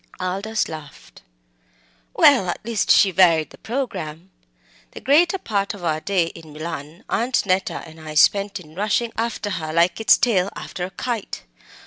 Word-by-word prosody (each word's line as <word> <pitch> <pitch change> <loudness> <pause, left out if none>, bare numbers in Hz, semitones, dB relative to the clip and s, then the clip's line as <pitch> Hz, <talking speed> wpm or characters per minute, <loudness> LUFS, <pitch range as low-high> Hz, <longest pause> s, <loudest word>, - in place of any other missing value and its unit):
Aldous 195 +4 -2
laughed. 155 -3 -11 0.9
"Well, 245 -11 +5
at 175 - -5
least 230 -3 -1
she 195 - +6
varied 165 -3 +4
the - - -15
programme. 190 - -5 0.6
The - - -8
greater 340 +7 +3
part 205 - -2
of 190 - -12
our 155 -2 0
day 185 0 +1
in 160 -2 -13
Milan 155 0 -7
Aunt 245 +1 0
Neta 185 0 -1
and 160 0 -14
I 155 -1 -8
spent 200 +5 +3
in 155 -3 -15
rushing 215 +5 0
after 225 -2 -3
her 155 0 -4
like 170 +5 +2
its 220 - +6
tail 200 -6 +2
after 180 - -5
a - - -7
kite. 235 +1 -5
190 Hz, 160 wpm, -22 LUFS, 165-220 Hz, 0.9 s, she